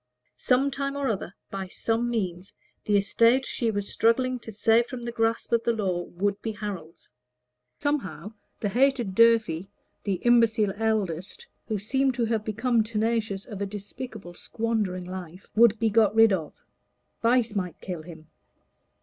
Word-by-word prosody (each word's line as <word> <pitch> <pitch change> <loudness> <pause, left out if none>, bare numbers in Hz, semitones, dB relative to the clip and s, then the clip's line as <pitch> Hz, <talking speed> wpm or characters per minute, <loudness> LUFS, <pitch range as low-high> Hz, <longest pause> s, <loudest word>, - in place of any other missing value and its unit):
Some 270 +2 +2
time 275 0 -3
or 280 -2 -1
other, 195 -3 -3 0.2
by 195 -1 -4
some 230 +5 -1
means, 185 -5 -3 0.3
the 205 -1 +3
estate 230 +6 +3
she 235 - -1
was 205 -2 -2
struggling 250 +2 +2
to 225 - -9
save 225 +3 +3
from 245 -2 -7
the 235 - -3
grasp 225 0 -1
of 235 -1 +3
the 235 - +2
law 190 -5 -1
would 200 +3 -2
be 225 - -3
Harold's. 190 - -7 0.7
Somehow 285 -7 -2 0.3
the 205 - 0
hated 245 -2 +2
Durfey, 220 -6 +4 0.4
the 200 -2 0
imbecile 225 -4 +4
eldest, 210 - -2 0.2
who 215 - -1
seemed 265 +6 0
to 240 -2 +1
have 225 -2 -1
become 230 +2 +1
tenacious 220 -2 -1
of 205 -5 -8
a 200 - -1
despicable 205 -1 -8
squandering 210 -3 -2
life, 185 0 -8
would 230 -1 +6
be 225 0 +1
got 215 -1 +4
rid 225 -2 +6
of; 160 -5 -4 0.6
vice 235 -1 +3
might 180 -4 -3
kill 180 -4 -5
him. 160 -1 -12
220 Hz, 160 wpm, -26 LUFS, 195-235 Hz, 0.7 s, would